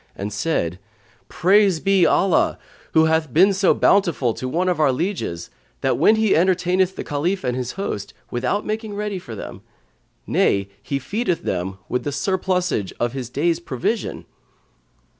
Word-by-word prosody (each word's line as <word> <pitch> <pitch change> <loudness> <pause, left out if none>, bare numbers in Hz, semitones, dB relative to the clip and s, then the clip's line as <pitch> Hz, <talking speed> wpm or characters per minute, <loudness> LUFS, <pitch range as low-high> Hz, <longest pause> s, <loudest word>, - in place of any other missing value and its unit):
and 100 +1 -5
said, 100 - -1 0.5
"Praise 190 0 +3
be 195 -1 +3
Allah, 195 -3 +2 0.4
who 160 0 +5
hath 160 -3 +1
been 190 +8 +5
so 190 0 +3
bountiful 170 - +2
to 130 - -5
one 175 +7 0
of 180 -3 0
our 150 -3 +4
lieges, 130 - -3 0.3
that - - +1 0.2
he 220 -2 +2
entertaineth 185 +1 +2
the - - -5
Caliph 170 +7 -1
and 125 -1 -1
his 125 -1 -3
host, 150 - -5 0.2
without 125 +12 -1
making 215 -1 -4
ready 205 -2 -3
for 115 -10 -9
them; - - -8 0.6
nay, 100 0 +1
he 140 - -2
feedeth 180 - -2
them 95 +1 -3
with 125 -1 -2
the 145 - -2
surplusage 180 - -1
of 120 0 0
his 130 -3 -5
day's 165 +6 0
provision!" 170 - -3
170 Hz, 155 wpm, -21 LUFS, 125-190 Hz, 0.6 s, who